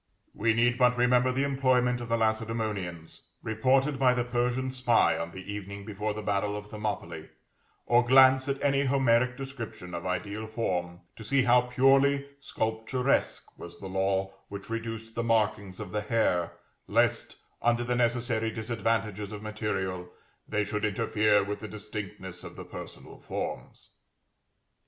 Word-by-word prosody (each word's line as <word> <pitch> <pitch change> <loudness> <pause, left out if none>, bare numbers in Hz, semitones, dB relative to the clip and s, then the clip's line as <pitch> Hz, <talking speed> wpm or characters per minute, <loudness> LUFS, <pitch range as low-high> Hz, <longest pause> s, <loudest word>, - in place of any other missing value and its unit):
We 110 +1 +1
need 120 +2 +2
but 125 -1 +4
remember 125 +1 +4
the 135 +2 0
employment 130 -3 +2
of 120 - -6
the 115 - +2
Lacedæmonians, 110 -6 -2 0.2
reported 130 +5 +2
by 130 -2 +4
the 120 - +1
Persian 125 +2 -1
spy 125 -2 +3
on 85 0 -3
the 95 +4 -8
evening 100 0 -7
before 105 0 -3
the 110 - -5
battle 105 0 0
of 105 - -7
Thermopylæ, 105 0 -5 0.6
or 120 +1 +4
glance 130 +2 +6
at 140 0 -1
any 140 0 +2
Homeric 125 -2 +2
description 120 -9 -7
of 85 +1 -4
ideal 105 +4 -3
form, 90 -6 -2 0.2
to 115 - -9
see 130 +5 +2
how 125 0 +5
purely 135 +3 +3
sculpturesque 125 +1 -1
was 85 0 -9
the - - -9
law 95 0 0 0.2
which 100 +2 -8
reduced 115 0 -5
the 115 - -2
markings 110 -4 0
of 105 -4 -6
the 105 - -1
hair, 105 -6 +1 0.3
lest, - - +1 0.2
under 120 0 +2
the 120 +1 -1
necessary 120 -1 +1
disadvantages 110 -2 -2
of 105 0 -7
material, 95 -4 -3 0.4
they 105 - +1
should 105 +1 -3
interfere 105 -1 +2
with 100 +1 -4
the 110 - -7
distinctness 100 -3 -7
of - - -9
the - - -8
personal - - -10
forms. - - -6
110 Hz, 150 wpm, -28 LUFS, 105-125 Hz, 0.6 s, glance